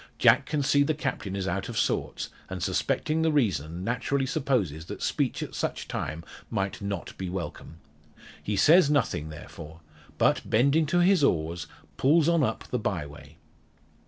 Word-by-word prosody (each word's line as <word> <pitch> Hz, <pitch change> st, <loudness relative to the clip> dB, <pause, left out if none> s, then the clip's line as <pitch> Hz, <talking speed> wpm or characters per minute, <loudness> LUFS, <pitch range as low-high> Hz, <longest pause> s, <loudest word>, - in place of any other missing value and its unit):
Jack -, -, +5 dB
can 150 Hz, -2 st, 0 dB
see 145 Hz, +1 st, +3 dB
the 150 Hz, +2 st, +2 dB
Captain 100 Hz, -9 st, -3 dB
is 95 Hz, -1 st, -2 dB
out 95 Hz, +3 st, -2 dB
of 115 Hz, -, -5 dB
sorts, -, -, -1 dB, 0.2 s
and 95 Hz, -2 st, -4 dB
suspecting 155 Hz, +1 st, 0 dB
the 160 Hz, 0 st, +2 dB
reason, 90 Hz, -, 0 dB
naturally 125 Hz, +5 st, 0 dB
supposes 125 Hz, -, -1 dB
that -, -, -7 dB
speech -, -, 0 dB
at -, -, -8 dB
such -, -, -3 dB
time 80 Hz, +2 st, -4 dB, 0.3 s
might 95 Hz, +1 st, -2 dB
not 100 Hz, -3 st, -4 dB
be 95 Hz, -1 st, -3 dB
welcome. 90 Hz, -3 st, -6 dB, 0.7 s
He 105 Hz, -, -2 dB
says 160 Hz, -, +6 dB
nothing, 120 Hz, -, 0 dB
therefore; 80 Hz, +1 st, -10 dB, 0.4 s
but, -, -, +3 dB
bending 140 Hz, +7 st, +3 dB
to 175 Hz, +4 st, +2 dB
his 180 Hz, -3 st, +4 dB
oars, 85 Hz, -, 0 dB, 0.3 s
pulls 155 Hz, +3 st, +4 dB
on 170 Hz, -1 st, +3 dB
up 110 Hz, -5 st, -1 dB
the 125 Hz, -, -1 dB
bye 95 Hz, -8 st, -2 dB
way. 75 Hz, +1 st, -13 dB
110 Hz, 165 wpm, -27 LUFS, 85-145 Hz, 0.7 s, says